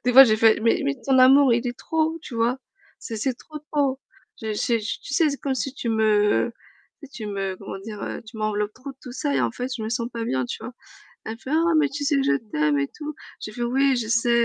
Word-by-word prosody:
Des 250 - +2
fois 270 +2 +11
j'ai 220 -3 +3
fait: 225 0 +5
«Mais 230 - +3
mais 140 - +1
ton 265 -1 +4
amour 265 0 +7
il 235 +2 +1
est 245 0 -3
trop, 320 0 -1
tu - - -9
vois? 235 +3 +1 0.4
C'est 225 - -6
c'est 255 +4 -1
trop, 305 +5 -10
trop. 275 -3 +1 0.4
Je 220 - -2
j'ai 230 +2 +1
tu 250 +6 -5
sais, 315 0 +4
c'est 280 - -5
comme 275 -2 -1
si 265 +1 -3
tu 245 - -4
me 215 0 +3 0.5
tu 285 - -10
sais, 275 - -25
tu 215 -2 -6
me 195 -2 -3
comment 195 0 -7
dire? 210 0 -6
Tu 215 - -11
m'enveloppes 210 -1 -1
trop 270 +2 -8
de - - -32
tout 250 - -8
ça 285 +3 -1
et - - +2
en - - +1
fait 250 +1 -4
je 225 - -6
me 215 - -3
sens 235 +1 -2
pas 230 -1 -3
bien, 130 - 0
tu - - -5
vois?» 235 +3 -6 0.5
elle 220 - -4
me - - -15
fait: 260 - -9
«Oh 335 +1 +3
mais 300 - +3
tu 290 +1 -4
sais 285 0 +2
que 275 - +2
je 275 - +3 0.2
t'aime 150 -1 +2
et 140 0 0
tout». 300 0 -6 0.3
J'ai 215 - -6
fait: 240 - -5
«Oui, 265 +3 +2
je 225 -2 -2
sais». 230 +1 +2
240 Hz, 270 wpm, -24 LUFS, 215-275 Hz, 0.5 s, fois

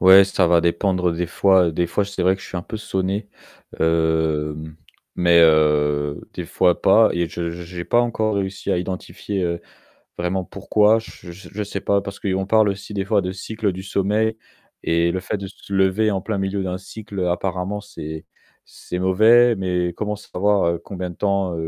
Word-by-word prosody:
Ouais, 95 +1 +8
ça 95 -2 +1
va 85 -1 +5
dépendre 90 +1 +1
des 85 +1 -2
fois. 95 0 +3
Des 85 +2 0
fois, 100 +4 0
c'est 100 -2 -4
vrai 95 +1 +4
que 95 - -11
je - - -9
suis - - -6
un 90 - -3
peu 110 - -6
sonné, 95 -1 -2 0.5
hem, 80 -1 0 0.4
mais 85 -1 +4
heu, 75 -2 +3
des - - -4
fois 90 -1 +2
pas 110 +3 +5
et 85 -1 -1
je 85 0 -4
j'ai 85 +1 -7
pas 120 - +3
encore 110 -3 0
réussi 95 -1 -3
à - - +1
identifier, 95 +2 -4
heu, 85 -1 -2 0.6
vraiment 90 +1 -1
pourquoi, 105 +3 +2
j 115 - -12 0.2
je 95 +3 -13
je 105 - -3
sais 100 - -5
pas 100 0 +1
parce 100 0 -8
qu'on 95 -1 -1
parle 110 +1 +4
aussi 100 +1 -5
des 95 - -1
fois 100 0 +2
de 90 - -3
cycle 105 +2 -3
du 95 +1 -7
sommeil 105 +3 0 0.5
et 85 +1 +2
le 95 - -1
fait 95 - -3
de 100 - -6
se 100 +1 -14
lever 95 +3 +2
en 95 - -1
plein 100 +1 -3
milieu 95 0 -1
d'un 90 -1 -3
cycle, 105 +1 -10
heu, 90 -1 0
apparemment 95 +3 -2
c'est 80 -6 -8 0.4
c'est 90 - -7
mauvais 110 +6 +5
mais 90 -2 -1
comment 105 0 -2
savoir 100 -3 0
combien 90 -2 -5
de - - -10
temps 100 -3 0
95 Hz, 195 wpm, -21 LUFS, 85-100 Hz, 0.6 s, Ouais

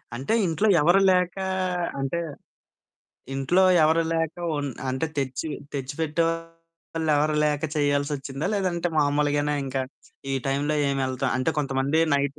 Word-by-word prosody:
అంటే 135 - -2
ఇంట్లో 175 +6 +1
ఎవరు 175 +6 +5
లేకా 180 +1 +1 0.5
అంటే, 135 +5 -1 1.2
ఇంట్లో 140 +8 +2 0.2
ఎవరు 160 +2 +3
లేక 165 -1 -1 0.2
ఒన్ 145 -1 -2 0.2
అంటే 130 +5 -1
తెచ్చి 135 +2 -2 0.2
తెచ్చి 135 -1 -4
పెట్టేవాళ్ళెవరు 165 -1 -1
లేక 150 0 0
చేయాల్సొచ్చిందా? 145 +1 -1
లేదంటే 180 -3 0
మామూలుగానే 145 0 +2
ఇంకా 135 0 -2 0.5
ఈ - - +1
టైమ్‌లో 145 +3 0
ఏమి 135 -1 0
ఎళ్తాం, 130 +1 -1
అంటే 160 +5 +1
కొంతమంది 140 +2 +1
నైట్, 140 +1 0
150 Hz, 120 wpm, -25 LUFS, 140-165 Hz, 1.2 s, ఎవరు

